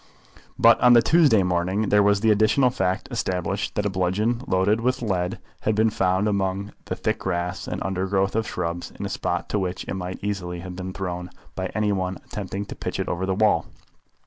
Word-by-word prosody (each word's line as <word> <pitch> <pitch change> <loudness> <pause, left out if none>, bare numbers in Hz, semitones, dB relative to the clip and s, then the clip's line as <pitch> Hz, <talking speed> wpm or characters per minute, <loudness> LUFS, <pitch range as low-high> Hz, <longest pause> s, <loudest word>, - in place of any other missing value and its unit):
But 115 -1 +6
on 125 0 +7
the 120 -1 +7
Tuesday 150 - +5
morning 90 +4 0
there 105 - +5
was 100 0 +3
the 110 -1 +4
additional 110 +5 +3
fact 95 -7 -1
established 95 +2 -2
that 105 - 0
a - - +2
bludgeon 100 +6 0
loaded 100 +3 +2
with 125 +1 0
lead 90 -4 -1 0.2
had 110 - 0
been 110 +1 +3
found 95 0 +1
among 100 0 -1
the - - -3
thick - - -1
grass 90 +2 -3
and - - -3
undergrowth 95 +1 0
of 110 -1 0
shrubs 85 +1 -3
in - - -3
a - - -3
spot - - -2
to 105 - 0
which 90 -1 -3
it - - -3
might 90 -1 -4
easily 90 -4 -3
have 90 0 -7
been 95 0 -5
thrown 90 -2 -4 0.2
by - - -3
any 105 -1 +1
one 95 -1 -1
attempting 100 0 -5
to - - -8
pitch - - -4
it - - -1
over 95 +2 -2
the 95 - 0
wall. 105 +1 +2
95 Hz, 205 wpm, -24 LUFS, 90-110 Hz, 0.2 s, on